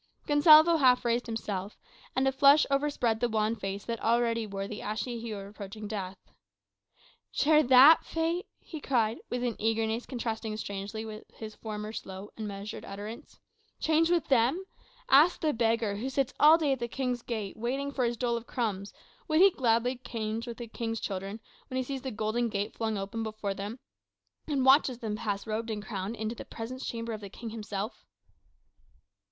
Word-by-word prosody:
Gonsalvo 310 +3 +7
half 255 -4 +4
raised 235 +1 +1
himself, 205 -3 -4 0.4
and 265 +1 +2
a - - +4
flush 280 +3 +6
overspread 275 -5 +1
the 240 0 +1
wan 215 0 +1
face 195 -1 -5
that 230 -1 -4
already 230 -1 +1
wore 195 -1 -4
the 210 +1 -7
ashy 225 +3 -3
hue 225 -2 -5
of 195 - -7
approaching 205 +1 -8
death. 195 -3 -5 1.1
"Share 305 +1 +4
that 265 +4 +8
fate!" 330 +2 -2
he 315 -3 -9
cried, 230 -5 +1
with 245 0 -2
an 240 -3 -1
eagerness 225 +1 0
contrasting 225 -3 -3
strangely 205 +1 -5
with 215 0 -8
his 220 -1 -8
former 215 0 -6
slow 190 -1 -7
and 215 -1 -5
measured 200 +1 -6
utterance. 205 +3 -8 0.4
"Change 320 +1 +3
with 345 -4 +1
them? 265 +9 +2 0.4
Ask 300 +6 +6
the 310 -2 +1
beggar, 225 -3 +1
who 250 +6 -3
sits 270 0 0
all 310 +2 +8
day 305 -4 +1
at 265 - 0
the 235 - -2
King's 250 0 -2
gate, 220 -5 -4
waiting 270 +5 -2
for 265 -2 -1
his 235 0 0
dole 240 -1 0
of 235 - -9
crumbs, 205 -5 -2 0.4
would 310 0 +2
he 390 +2 +8
gladly 245 -2 +1
change 225 -1 -4
with 235 - -6
the 240 - -6
King's 225 0 -4
children, 195 +2 -4 0.3
when 260 - -4
he 260 - +1
sees 270 +1 -5
the 265 - -4
golden 220 +1 -1
gate 205 +1 -2
flung 220 -2 -2
open 200 +4 -4
before 215 -2 -3
them, 205 +4 -6 0.7
and 280 -4 0
watches 265 -2 +5
them 220 -3 -3
pass 205 -3 -3
in 220 - -6
robed 225 +2 -2
and 210 -2 -4
crowned, 205 +1 -4
to 220 +1 -3
the 235 - -8
presence 250 +3 -7
chamber 230 -1 -4
of 215 - -6
the 200 - -8
King 225 +3 -8
himself." 215 -1 -5
230 Hz, 185 wpm, -29 LUFS, 215-260 Hz, 1.1 s, that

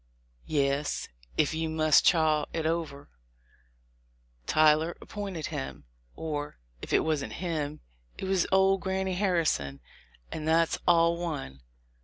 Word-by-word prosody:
"Yes 140 -1 0 0.3
(if 150 - +2
you 160 0 -1
must 155 -1 +4
chaw 155 -3 +3
it 160 -1 -2
over), 160 - -3 1.4
Tyler 155 +2 +4
appointed 195 -7 -5
him; 65 +2 -5 0.3
or, 145 - -4 0.2
if - - -7
it - - +4
wasn't 155 -3 -1
him, 155 -4 -3 0.4
it - - -5
was 190 -2 +1
old 190 0 +4
Granny 190 0 -1
Harri 180 -5 +2
son, 70 - -1 0.5
and 155 0 -4
that's 165 +1 +2
all 170 -1 +4
one. 70 - -5
160 Hz, 125 wpm, -28 LUFS, 150-175 Hz, 1.4 s, must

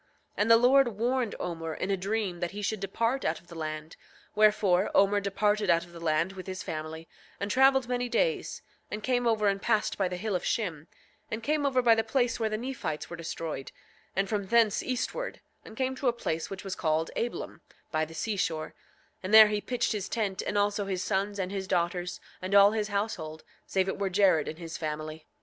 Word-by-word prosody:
9:3 - - -41
And 210 +2 +1
the 230 - +9
Lord 260 +3 +5
warned 245 0 0
Omer 165 -2 -4
in 195 - -2
a - - +3
dream 195 -1 -2
that 175 0 -1
he 205 0 -5
should 215 +1 -1
depart 230 +7 -1
out 160 - 0
of 175 - -24
the - - -10
land; 155 0 -5 0.4
wherefore 210 -3 +4
Omer 200 +1 +5
departed 205 +1 0
out 170 0 +3
of 175 - -17
the 170 - -10
land 165 +3 +1
with 185 -1 -9
his 185 0 -5
family, 160 +1 -6 0.3
and 200 +1 -2
traveled 265 0 +4
many 245 0 -1
days, - - 0 0.3
and 210 0 -5
came 245 -1 +1
over 215 -2 +2
and 195 0 +1
passed 215 -3 +1
by 190 - +2
the 180 0 -4
hill 210 +1 -2
of 180 - 0
Shim, 165 -8 -2 0.4
and 220 +1 -4
came 295 +1 +1
over 255 -2 +2
by 235 -1 +7
the 225 0 +2
place 240 +1 0
where 220 -1 +1
the 215 - -1
Nephites 230 - -4
were - - -4
destroyed, 160 -4 -5 0.4
and 195 +1 +1
from 200 -1 -2
thence 230 -1 +3
eastward, 260 - -3 0.2
and 220 - -12
came 260 0 0
to 270 - -1
a 240 - +4
place 165 -8 -3
which 195 -1 -7
was 195 -2 -4
called 160 -2 0
Ablom, 240 - -3 0.3
by 155 -1 +1
the 160 +1 -7
seashore, 170 -6 -2 0.5
and 185 - -5
there 220 -1 +10
he 210 0 -1
pitched 235 +3 -1
his 205 -3 -3
tent, 200 -5 -1
and 205 - -2
also 205 0 +1
his 190 -2 -2
sons 200 +1 -1
and 190 -1 -2
his 195 -1 -4
daughters, 180 -1 -1 0.2
and 185 +2 -1
all 200 0 +8
his 215 -1 -1
household, 200 -7 -3 0.2
save 190 -1 +1
it 190 - -3
were 200 -1 0
Jared 185 -5 +3
and 155 - -5
his 165 -1 -7
family. 155 0 -5
200 Hz, 215 wpm, -29 LUFS, 175-225 Hz, 0.5 s, there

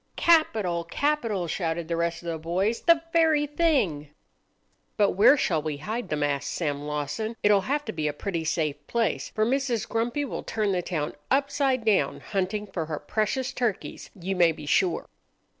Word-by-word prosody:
"Capital! 220 - +3
capital!" 230 - -1
shouted 165 -1 -2
the 170 - -1
rest 170 0 -1
of 170 - -4
the 165 -1 -3
boys 185 +8 -1
"The 335 -1 +4
very 320 -3 +4
thing!" 275 - +1 0.9
"But 205 -2 +4
where 215 +9 +6
shall 165 - +1
we 150 -1 -3
hide 210 +7 -4
them?" 150 -1 -1
asked 140 -1 -1
Sam 145 -4 -2
Lawson. 150 +10 -3
"It'll 205 -1 +5
have 290 +8 -1
to - - -3
be 155 -2 -1
a - - +1
pretty 170 +2 -3
safe 150 -2 -2
place, 230 -2 0
for 215 - 0
Mrs. 255 -3 0
Grumpy 235 +6 -1
will 265 - -5
turn 215 -2 -1
the 180 -2 0
town 155 -4 -3 0.2
upside 270 -2 +1
down 215 -3 +2
hunting 200 +1 -2
for 180 -5 -4
her 155 -2 -3
precious 250 - -1
turkeys, 235 -6 -3
you 190 +2 -2
may 175 -2 +5
be 150 -1 -9
sure." 170 +3 +1
195 Hz, 175 wpm, -26 LUFS, 165-245 Hz, 0.9 s, where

